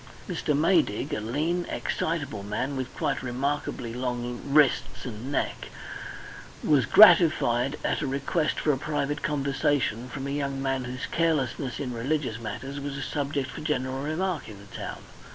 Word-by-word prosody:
Mr. 150 - 0
Maydig, 155 - +2
a - - 0
lean, 155 +10 0
excitable 145 -10 -2
man 105 +8 -2
with 130 -1 -3
quite - - -1
remarkably 130 -2 -2
long 125 -1 -3
wrists 140 -1 +3
and 125 +2 -6
neck, - - -1 1.0
was 145 -4 +4
gratified 150 - +6
at - - +1
a 150 - -1
request 140 +4 0
for 150 - +2
a 135 - -1
private 145 -1 -1
conversation 140 -4 0
from 135 +1 -5
a 140 - -3
young 140 -1 -2
man 135 -1 -1
whose 125 0 -4
carelessness 140 -5 0
in 130 -3 -3
religious 125 -1 -1
matters 135 +5 -5
was 140 0 -4
a 135 - -3
subject 140 0 -2
for - - -7
general 135 -4 -1
remark 160 +2 -2
in 105 - -9
the 100 0 -13
town. - - -6
140 Hz, 155 wpm, -27 LUFS, 125-150 Hz, 1.0 s, gratified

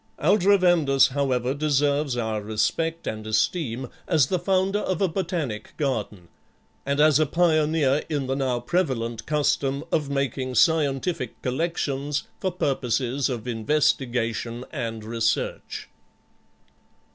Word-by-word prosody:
Aldrovandus, 175 -6 +4
however, 130 -2 0
deserves 145 -2 +1
our 110 -2 -1
respect 160 +10 -1
and 110 0 -4
esteem 120 +3 0 0.2
as 160 -6 +4
the 180 +7 -1
founder 195 +2 +1
of 185 -4 -2
a 195 - +3
botanic 165 - -3
garden, 110 - -2 0.6
and 140 +1 0
as 150 -1 +5
a 155 - +3
pioneer 155 -3 +2
in 145 -3 -1
the 135 +1 -1
now 130 -3 0
prevalent 120 -6 -1
custom 145 -2 0
of 150 -3 0
making 135 -2 -2
scientific 145 -3 +1
collections 145 0 -1 0.2
for 185 - -1
purposes 135 -4 0
of 120 -2 -4
investigation 120 -1 0
and 115 -6 -4
research. 115 0 -2
140 Hz, 115 wpm, -25 LUFS, 120-160 Hz, 0.6 s, as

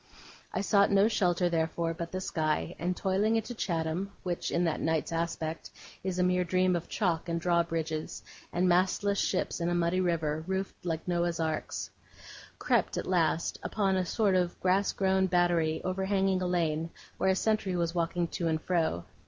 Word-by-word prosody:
I 185 - -1
sought 200 0 +4
no 200 +1 +5
shelter, 180 -5 +2
therefore, 165 0 0
but 170 +1 -6
the 185 - -3
sky; 160 -1 -1
and 180 +1 -1
toiling 200 +4 +1
into 225 +2 -2
Chatham, 175 -1 -2
which, 175 -2 -2
in 170 - +1
that 165 -3 0
night's 160 0 0
aspect, 165 -1 -3 0.3
is 185 -1 -2
a 180 - +2
mere 180 0 +2
dream 185 +1 +2
of 170 - -4
chalk, 175 -5 -1
and 170 0 0
drawbridges, 165 -2 -1 0.3
and 180 +1 +1
mastless 190 +3 +2
ships - - -1
in 170 - +1
a 175 - 0
muddy 175 +2 +1
river, 160 -3 0
roofed 190 0 -3
like 165 0 -3
Noah's 175 -1 0
arks, 160 -1 -2 0.7
crept, - - +1
at - - -2
last, 165 -3 +1
upon 195 -3 0
a 185 - +1
sort 200 +2 +1
of 180 -1 0
grass 190 +2 +2
grown 190 -1 +2
battery 175 -3 +2
overhanging 190 0 +1
a 180 - 0
lane, 165 -2 0 0.3
where 190 - +2
a 190 - +3
sentry 205 -2 0
was 170 -1 0
walking 170 0 0
to 170 - -2
and 160 -1 +1
fro. 160 - 0
175 Hz, 175 wpm, -30 LUFS, 165-190 Hz, 0.7 s, no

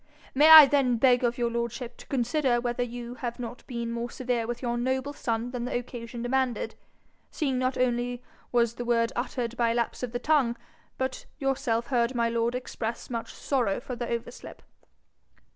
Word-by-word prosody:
'May 295 +4 +6
I 315 -2 +13
then 270 -4 +2
beg 250 +1 +4
of 240 0 +1
your 240 -1 0
lordship 235 +1 -3
to - - -13
consider 255 0 +1
whether 240 0 -2
you 240 0 -4
have 240 -2 -5
not 240 0 -7
been 235 -2 -4
more 235 +1 -3
severe 240 -2 -2
with 240 +1 -5
your 240 -1 0
noble 260 +3 -1
son 235 -3 -2
than 245 -1 -3
the 245 - -1
occasion 240 -1 -7
demanded, 255 -2 0 0.6
seeing 270 -5 -1
not 255 0 0
only 245 0 0 0.3
was 235 -2 +2
the 240 - -5
word 235 -1 +1
uttered 240 -1 -3
by 235 -1 +2
a 230 - 0
lapse 235 -1 -1
of 250 -2 -3
the 245 - -2
tongue, 260 -3 +2 0.4
but 260 0 -3
yourself 250 -5 0
heard 245 -1 +1
my 235 -1 +2
lord 235 +1 0
express 235 -2 -5
much 230 -1 -4
sorrow 245 -8 0
for 250 0 -6
the 240 0 -4
overslip?' 235 +1 -6
245 Hz, 185 wpm, -27 LUFS, 235-255 Hz, 0.6 s, I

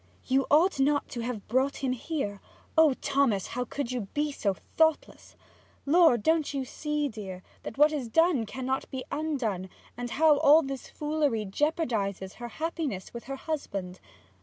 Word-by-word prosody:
'You 265 +1 +2
ought 320 +2 +4
not 285 +1 +2
to 240 - -6
have 230 -3 -4
brought 265 +4 0
him 260 - +1
here. 255 -6 -3 0.3
Oh 315 -4 +6
Thomas, 270 -9 +2
how 250 0 -3
could 265 -1 -4
you 240 -6 -3
be 295 0 +1
so 200 -8 -1 0.2
thoughtless! 320 -1 +1 0.5
Lord, 295 -7 +5
don't 320 -3 +2
you 270 -1 -1
see, 300 +2 -2
dear, 195 -6 -7 0.2
that - - -8
what 300 +2 +6
is 285 -6 -3
done 295 -2 +3
cannot 260 +2 -3
be 260 -1 -5
undone, 245 - -2 0.3
and 245 0 -5
how 300 +2 +4
all 305 +3 +7
this 270 -1 -6
foolery 295 -7 -1
jeopardizes 205 - -1
her 240 - -6
happiness 310 - -4
with 235 - -8
her 275 +2 -4
husband? 200 - -4
270 Hz, 160 wpm, -28 LUFS, 230-300 Hz, 0.5 s, all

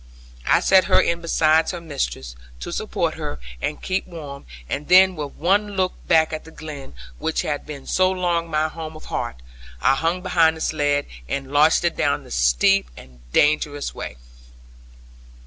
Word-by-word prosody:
I - - +4
set 190 -1 +5
her - - +4
in 170 0 +1
beside 160 -1 +3
her 175 - -4
mistress, 135 - -4 0.3
to - - -5
support - - -1
her, - - -6 0.2
and 150 - -2
keep 185 +1 -1
warm; 145 - -9 0.2
and 145 - -4
then 185 +1 +6
with 145 -3 -5
one 200 +5 +1
look 185 -1 +1
back 160 -1 +4
at 155 - -4
the - - -13
glen, 150 - -9 0.2
which 160 - -1
had 145 -1 -3
been 145 -3 -8
so 185 0 +2
long 175 -3 -1
my 155 0 +1
home 160 0 -7
of 155 - -12
heart, - - -2 0.4
I 100 - +4
hung 165 +6 -1
behind 165 -3 +3
the - - -9
sledd, 145 -2 +1 0.2
and 135 0 -4
launched 155 +4 +4
it 170 - +1
down - - 0
the - - -15
steep - - +3
and 65 -1 -14
dangerous 145 - +1
way. 65 - -7
155 Hz, 175 wpm, -22 LUFS, 145-170 Hz, 0.4 s, then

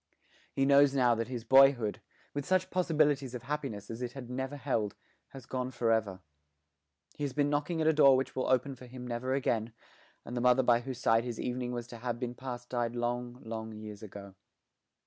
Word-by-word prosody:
He 135 - +1
knows 140 0 +5
now 125 -3 +4
that 115 0 -2
his 125 -2 -5
boyhood, 130 -3 +5 0.3
with 145 - -2
such 185 +3 +1
possibilities 150 -7 +1
of 120 - -6
happiness 135 -8 -4
as 115 +2 -7
it 125 0 -4
had 130 -3 -8
ever 135 +2 -3
held, 115 -7 -1 0.3
has 135 -2 -11
gone 130 0 -3
for 120 -2 0
ever. 105 -5 0 0.9
He 145 - -6
has 140 -3 -2
been 145 +1 +1
knocking 150 +3 -1
at - - +1
a 160 - +5
door 140 -3 +6
which 130 - -3
will 130 - -1
open 130 +2 +2
for 125 0 -13
him 125 0 -9
never 125 +2 -2
again, 115 -4 -1 0.5
and 120 - -6
the 120 - -1
mother 125 +1 +4
by 120 -1 +4
whose 125 0 -6
side 115 -2 +3
his 120 -2 -5
evening 125 0 -2
was 120 -1 -4
to 120 - -8
have 120 0 -4
been 120 -1 -3
passed 125 -1 -7
died 120 -1 -1
long 120 +1 -3
long 110 0 -6
years 105 -1 -9
ago. 100 -2 -10
125 Hz, 205 wpm, -31 LUFS, 115-135 Hz, 0.9 s, door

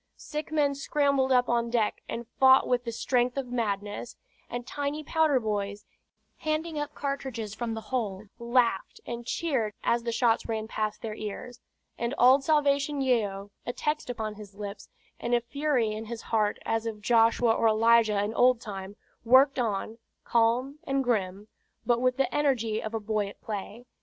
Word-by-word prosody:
Sick 300 0 -6
men 295 -2 +2
scrambled 280 -1 +1
up 250 -1 +4
on 235 0 +1
deck 230 -3 0
and 235 - -4
fought 265 0 +6
with 245 0 +1
the 230 - -2
strength 245 +2 0
of 265 -3 -3
madness; 205 -2 -3 0.3
and 240 0 -5
tiny 290 +3 -3
powder 310 -3 +2
boys, 205 -2 -3 0.5
handing 310 0 -2
up 295 - -4
cartridges 265 -7 -4
from 225 0 -3
the 220 - -5
hold, 215 -5 -3
laughed 235 -4 +1
and 235 0 -6
cheered 250 -12 -1
as 235 0 +2
the 235 0 -2
shots 230 -1 +2
ran 220 -1 -2
past 215 -1 -3
their 220 -2 -3
ears; 215 +3 -7 0.4
and 235 +3 -1
old 260 +3 +6
Salvation 285 -1 +2
Yeo, 205 -7 0
a 245 - -4
text 300 -1 -2
upon 220 -3 -3
his 205 -2 -12
lips, 200 -1 -7 0.3
and 240 +1 +1
a - - +3
fury 255 -2 0
in 215 +1 -5
his 230 0 -7
heart 215 -2 +1
as 225 0 -1
of 210 -2 -6
Joshua 230 0 +4
or 225 - +2
Elijah 220 -1 +4
in 210 +2 -2
old 250 0 +4
time, 200 -3 -7 0.3
worked 260 +3 +5
on, 220 0 -2 0.2
calm 240 +5 +1
and 275 -4 0
grim, 205 -4 -1 0.4
but 240 -1 +2
with 255 0 +2
the 270 -2 0
energy 235 -7 +1
of 220 +1 -5
a - - 0
boy 210 -1 -1
at 200 - -11
play. 215 +3 -6
235 Hz, 175 wpm, -28 LUFS, 215-265 Hz, 0.5 s, fought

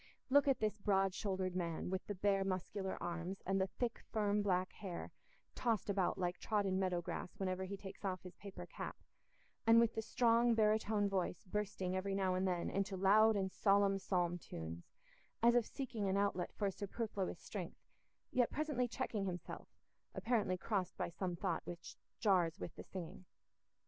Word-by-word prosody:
Look 285 +1 +6
at 270 - +4
this 215 0 0
broad 195 -2 +2
shouldered 190 -2 -1
man 170 -1 -2
with 190 0 -2
the 205 - -3
bare 195 +1 +2
muscular 190 +1 -2
arms, 175 +2 -4
and 195 +1 +2
the 190 - +2
thick, 235 +4 -3
firm, 210 -1 +2
black 185 -2 +1
hair 185 -4 -6 0.4
tossed 225 -4 0
about 190 -2 +1
like 180 -1 -1
trodden 200 -3 +1
meadow 180 -2 0
grass 175 - -5
whenever 190 -1 -1
he 200 +1 -5
takes 190 +1 -9
off 185 -2 -2
his 180 -2 -9
paper 200 -1 -8
cap, - - -6 0.7
and 230 0 +8
with 235 -1 +4
the 220 - -1
strong 230 +1 +4
barytone 215 -1 +3
voice 185 -3 -1
bursting 190 -2 -2
every 195 +1 -1
now 190 -1 +2
and 185 +1 +1
then 175 -2 0
into 195 0 -1
loud 215 +4 +6
and 190 -1 0
solemn 200 -1 +3
psalm 175 -2 0
tunes, 85 - -7 0.5
as 235 0 +7
if 240 -2 +3
seeking 230 -7 -3
an 190 - +2
outlet 200 -3 +1
for 200 -2 0
superfluous 200 0 -3
strength, - - -6 0.5
yet 245 -2 +3
presently 295 -5 0
checking 215 -3 -2
himself, 180 -3 -5 0.5
apparently 220 -6 +1
crossed 190 0 -1
by - - -1
some 180 +1 -3
thought 170 -1 -1
which 170 -1 -7 0.2
jars 185 -5 +3
with 170 - -5
the - - -8
singing. 185 0 -7
195 Hz, 175 wpm, -38 LUFS, 185-210 Hz, 0.7 s, and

